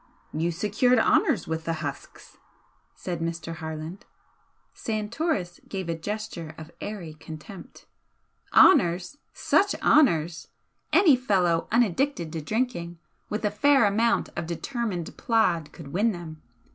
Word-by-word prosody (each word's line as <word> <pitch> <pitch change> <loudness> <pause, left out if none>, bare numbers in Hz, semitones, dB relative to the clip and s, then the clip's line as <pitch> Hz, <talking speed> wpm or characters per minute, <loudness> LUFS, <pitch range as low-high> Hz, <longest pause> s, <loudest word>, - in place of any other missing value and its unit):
"You 160 +3 0
secured 210 +8 +2
honours 225 - +3
with 160 0 -3
the 165 - 0
husks," 140 -1 -8 0.6
said 175 -2 -5
Mr. 165 0 -4
Harland. 160 +6 -7 0.7
Santoris 215 - -2
gave 190 -3 -4
a 165 - 0
gesture 175 -3 -5
of 160 +1 -10
airy 190 -7 -6
contempt. 155 +5 -11 0.7
"Honours! 180 - +5
Such 400 0 +2
honours! 170 - +3 0.4
Any 345 -8 +6
fellow 185 -9 +1
unaddicted 230 - +1
to 160 - -3
drinking, 175 -2 -2 0.3
with 210 +1 -2
a 205 - +1
fair 270 +4 +4
amount 225 +3 +2
of 170 -1 -4
determined 185 -1 -3
plod 175 -10 +1
could 155 -5 -11
win 215 +5 +2
them. 160 -3 -9
180 Hz, 120 wpm, -26 LUFS, 165-225 Hz, 0.7 s, Any